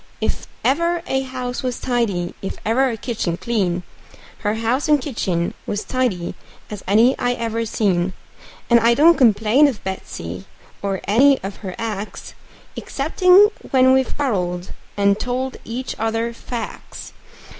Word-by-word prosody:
And - - +1
if - - -12 0.2
ever 335 +5 +1
a 265 -5 0
house 255 -1 -4
was 250 -2 -3
tidy, 210 -9 -1
and 195 - -5
ever 255 +5 +3
a 230 - -3
kitchen 210 -7 -2
clean, 185 -7 -1 0.6
Her 210 0 -1
house 230 +5 0
and 300 -1 +5
kitchen 185 - -2
was 205 - -2
tidy 235 -10 -1 0.4
as 205 -2 -6
any 225 +6 +5
I 245 0 +1
ever 230 -1 -2
seen; 185 -4 0 0.5
And 235 -1 +6
I 230 +1 +4
don't 330 +5 +6
complain 225 +3 +4
of 250 -7 -4
Betsey, 95 - -6 0.4
or 195 -1 -2
any 265 +6 +4
of 195 0 -5
her 190 -4 -7
acts, 215 -2 -5 0.4
Exceptin' 365 +8 +4 0.2
when 260 -1 +5
we've 265 -1 +1
quarreled, 180 -10 -1 0.3
and 200 0 +3
told 255 +1 -2
each 245 +3 -4
other 225 +1 -1
facts. 235 0 -7
230 Hz, 145 wpm, -21 LUFS, 200-260 Hz, 0.6 s, And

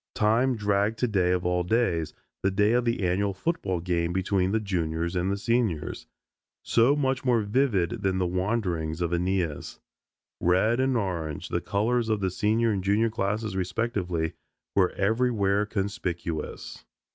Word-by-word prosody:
Time 115 +5 +2
dragged 105 +1 +1
today 100 -8 +1
of 90 -1 0
all 90 0 +1
days, 90 -5 0 0.3
the 95 - +2
day 105 +2 +2
of 120 +1 +2
the 115 -3 0
annual 95 +2 0
football 95 - -1
game 85 -1 -1
between 95 0 0
the 110 - +2
Juniors 85 -4 -2
and 90 +1 0
the 100 - 0
Seniors, 105 -7 -1 0.6
so 120 +5 +4
much 135 -2 0
more 120 -4 +2
vivid 105 -5 +1
than 95 -1 0
the 95 - +1
wanderings 90 -4 -1
of 85 0 0
Aeneas. 90 -3 -1 0.6
Red 95 +7 +2
and 130 -1 +2
orange, 85 -8 -3
the - - -1
colors 110 +3 0
of 110 -1 +1
the 95 -2 -1
Senior 110 +4 +1
and 95 -3 -2
Junior 105 +4 +2
classes 105 0 -2
respectively, 90 -4 -1 0.4
were 95 -2 +4
everywhere 105 -2 +1
conspicuous. 90 -6 -4
100 Hz, 150 wpm, -27 LUFS, 90-115 Hz, 0.6 s, so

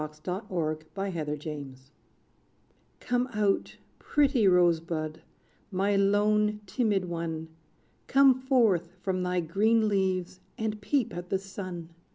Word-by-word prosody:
=The 155 +5 -5
Rose 155 -4 -1 0.2
Bud 195 -2 -3
of 155 -2 -3
Autumn= 150 -2 -5 1.2
Come 245 +1 0
out 210 -2 0 0.2
pretty 275 -7 +2
Rose 175 -3 +5
Bud, 160 -1 -4 0.5
my 200 +1 +1
lone, 210 +1 +2
timid 205 -3 0
one! 165 -2 -4 0.6
Come 270 -1 +6
forth 240 -10 +2
from 185 -1 -1
thy 180 0 0
green 215 +7 +2
leaves, 185 -2 0 0.2
and 215 -1 -3
peep 255 -1 0
at 175 0 -6
the 195 - +1
sun! 185 -3 -7
190 Hz, 125 wpm, -28 LUFS, 170-210 Hz, 1.2 s, Come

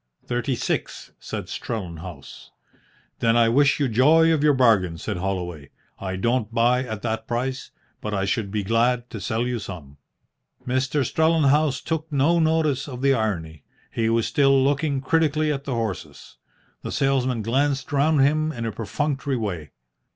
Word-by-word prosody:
"Thirty 120 +1 -1
six," - - -3
said - - -6
Strellenhaus. 85 - -7 0.7
"Then 115 0 +3
I 115 -1 +4
wish 140 +5 +3
you 140 - +2
joy 155 +8 +4
of 150 -2 0
your 150 -2 +4
bargain," 105 -10 +3
said 80 - -4
Holloway. 90 -6 -4 0.3
"I 95 -1 -4
don't 115 +3 0
buy 120 +2 +2
at 110 -4 -6
that 110 -1 -3
price, 130 +2 -3 0.3
but 105 - -4
I 100 -2 0
should 100 +1 -1
be 105 0 -2
glad 120 +3 +1
to 110 - -6
sell 110 +6 -1
you 125 -1 -2
some." 80 -9 -9 0.7
Mr. 130 +2 0
Strellenhaus 155 -2 +2
took 160 -1 -3
no 150 +5 +3
notice 155 -4 +1
of 130 -2 -7
the 140 0 +4
irony. 85 - -2 0.3
He 115 -1 0
was 115 0 +2
still 135 -2 +3
looking 140 0 0
critically 155 +1 +1
at 140 0 -6
the 135 - -2
horses. 90 -11 -5 0.4
The - - -6
salesman 130 -4 0
glanced 135 +4 0
round 145 +1 +3
him 155 +3 +2
in 120 -5 -5
a 115 - -2
perfunctory 135 +5 -2
way. 90 -10 -4
125 Hz, 160 wpm, -23 LUFS, 105-140 Hz, 0.7 s, I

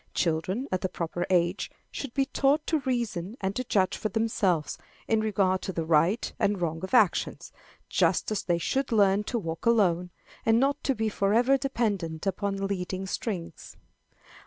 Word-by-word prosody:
Children, 185 - 0
at 185 - 0
the 185 - -1
proper 175 +1 -3
age, 175 +1 +1 0.2
should 275 -4 -6
be 275 -1 +2
taught 280 +2 +1
to 315 - +1
reason 235 -6 -2
and 195 +1 -2
to 255 - -1
judge 195 -6 +1
for 215 - -3
themselves, 200 -8 0 0.3
in 225 - +2
regard 195 -3 +1
to - - -3
the 165 -3 -3
right 165 +7 +2
and 200 -1 +1
wrong 165 0 -2
of 190 - -1
actions, - - +2 0.4
just - - +1
as 210 - 0
they 175 -1 0
should 265 - -1
learn 200 -2 +4
to 240 - -2
walk 165 0 -4
alone, 180 -6 +3 0.3
and 225 0 +4
not 280 +2 0
be 220 0 0
forever 220 +6 +3
dependent 205 - -2
upon 195 +1 -1
leading 190 -1 -3
strings. 180 -4 -5
195 Hz, 165 wpm, -27 LUFS, 180-230 Hz, 0.4 s, learn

